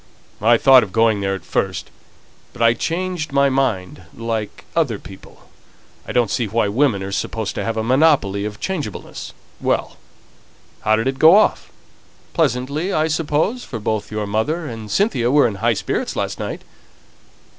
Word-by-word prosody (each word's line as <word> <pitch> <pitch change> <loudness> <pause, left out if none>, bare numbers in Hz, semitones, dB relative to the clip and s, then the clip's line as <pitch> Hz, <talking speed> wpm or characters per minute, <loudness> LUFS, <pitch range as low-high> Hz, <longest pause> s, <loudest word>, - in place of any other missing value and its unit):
"I 115 +2 +5
thought 130 +1 +7
of 100 - -5
going 110 -2 +2
there 95 0 0
at 95 - -10
first; - - -2 0.6
but - - -9
I 115 0 +6
changed 170 +4 -3
my 140 0 +3
mind 110 -10 -1 0.2
like 115 -2 -4
other 145 -10 +1
people. 95 -1 -14 0.6
I - - -4
don't 120 -5 +1
see 115 +2 0
why 105 0 0
women 115 -3 +1
are 95 - -5
to 110 +1 -3
have 115 0 -2
a 110 - 0
monopoly 125 -6 +3
of 105 0 -5
changeableness. 155 - -5 0.3
Well! - - -1 0.8
how 110 - +2
did 115 +2 -1
it 135 0 -2
go 160 +5 +8
off? 215 - +2 0.6
Pleasantly, 140 +9 0
I 155 -2 +1
suppose, 160 +10 0
for 115 - -6
both 110 0 -2
your 105 0 -2
mother 130 +12 -1
and 115 -5 -7
Cynthia 160 - +1
were 145 0 +5
in 105 -4 -5
high - - +2
spirits - - -2
last - - -3
night." - - -5
115 Hz, 165 wpm, -20 LUFS, 105-150 Hz, 0.8 s, go